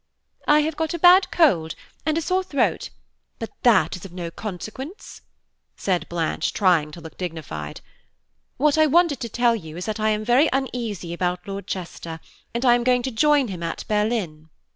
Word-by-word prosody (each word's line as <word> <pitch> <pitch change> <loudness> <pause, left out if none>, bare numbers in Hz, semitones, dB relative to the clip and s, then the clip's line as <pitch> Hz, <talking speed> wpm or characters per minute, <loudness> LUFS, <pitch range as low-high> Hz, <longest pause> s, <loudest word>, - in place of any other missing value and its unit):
"I 300 0 +6
have 310 +1 -2
got 320 +2 -2
a - - -2
bad 360 +3 +6
cold 175 - +2 0.3
and 310 0 +2
a 330 - -1
sore 370 +3 +1
throat, 285 -7 0 0.5
but 225 - -6
that 190 -10 +4
is 180 - -10
of 195 - -9
no 175 -2 -6
consequence," 215 - -8 0.5
said 185 -3 -1
Blanche, 170 -2 -1
trying 175 -7 +3
to 170 - -9
look 160 - -12
dignified. 155 - -6 0.8
"What 300 +3 +3
I 310 - +6
wanted 320 -2 +3
to 235 - -4
tell 240 +1 +2
you 160 -6 -8
is 180 - -5
that 215 0 -3
I 215 0 +2
am 215 0 -1
very 255 +7 +4
uneasy 235 -10 -3
about 180 +1 -2
Lord 200 0 -6
Chester, 170 -3 -6 0.3
and 235 +2 -2
I 240 - +7
am 240 0 +2
going 250 0 +2
to 260 - -2
join 285 +2 +3
him 180 -3 -6
at 165 -1 -4
Berlin." 210 -8 -1
215 Hz, 185 wpm, -23 LUFS, 175-275 Hz, 0.8 s, I